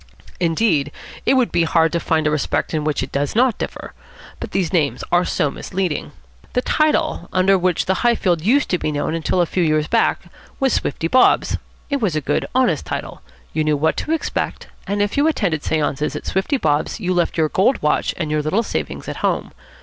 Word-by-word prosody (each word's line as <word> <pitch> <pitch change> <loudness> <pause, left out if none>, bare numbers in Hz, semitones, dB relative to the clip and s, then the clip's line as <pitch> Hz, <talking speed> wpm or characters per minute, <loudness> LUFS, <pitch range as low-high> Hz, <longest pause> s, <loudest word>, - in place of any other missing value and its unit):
Indeed, 165 -4 +1 0.4
it - - +5
would 255 -3 +2
be 170 - +2
hard 165 -1 +3
to 170 - 0
find 160 -2 0
a 150 - +2
respect 150 +2 -1
in 155 -1 0
which 150 -3 0
it 130 - -7
does 140 +5 -1
not 250 0 +3
differ. - - -6 0.5
But - - -5
these 190 -2 -1
names 155 -5 +1
are 175 +1 +4
so 145 - 0
misleading. 180 -3 -3 0.4
The 250 - +1
title 310 - +1
under 190 +1 +4
which 180 -2 +1
the 190 - +2
Highfield 190 -8 +2
used 250 - +3
to 180 - +1
be 155 - -1
known 155 +3 -2
till 180 - +1
a - - +3
few 180 - -1
years 155 -2 +2
back - - +2 0.4
was 270 -1 +2
"Swifty 160 +3 -1
Bob's." 255 +9 +3 0.3
It 280 -2 0
was 190 -8 0
a - - +2
good, 145 - -1
honest 220 - +2
title. - - -5 0.3
You 155 - +1
knew 155 -1 +1
what 160 +3 +1
to 310 - -3
expect; 325 - -2 0.2
and 205 +1 +1
if 205 - -2
you 290 +2 +4
attended 190 - 0
séances 150 -1 -1
at - - -6
Swifty 190 +10 0
Bob's 150 - 0
you 185 -3 -1
left 175 -1 0
your 155 -1 +2
gold 205 - +2
watch 150 - +1
and 155 -2 -2
your 155 0 +1
little 185 +10 0
savings - - -4
at - - -5
home. - - -1
175 Hz, 210 wpm, -20 LUFS, 155-210 Hz, 0.5 s, it